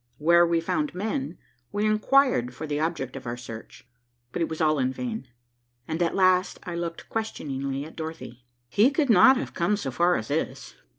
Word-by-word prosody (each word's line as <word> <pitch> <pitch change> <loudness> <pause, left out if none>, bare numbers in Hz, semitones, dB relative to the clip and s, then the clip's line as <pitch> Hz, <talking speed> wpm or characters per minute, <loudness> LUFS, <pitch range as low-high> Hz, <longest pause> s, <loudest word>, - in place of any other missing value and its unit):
Where 170 +3 +5
we 170 0 +2
found 300 - -1
men, 180 -6 -3 0.3
we 205 +1 0
inquired 215 - +3
for 155 - -6
the 150 -1 -2
object 155 -5 -2
of 130 -2 -8
our 120 +1 -3
search, 115 0 -10 0.4
but 175 - -3
it 165 - 0
was 160 - -5
all 155 -2 +2
in 130 0 +1
vain, 225 - -5 0.6
and 160 +2 -3
at 170 - +1
last 185 -1 +3
I 175 - -6
looked 170 -1 -5
questioningly 140 -10 -3
at 160 - -12
Dorothy. 160 -7 -7 0.2
"He 205 - +4
could 285 -2 +1
not 220 +7 +7
have 265 - -4
come 180 +4 +1
so 135 -10 -4
far 175 +6 +3
as 110 - -4
this." - - -3
170 Hz, 190 wpm, -26 LUFS, 135-205 Hz, 0.6 s, not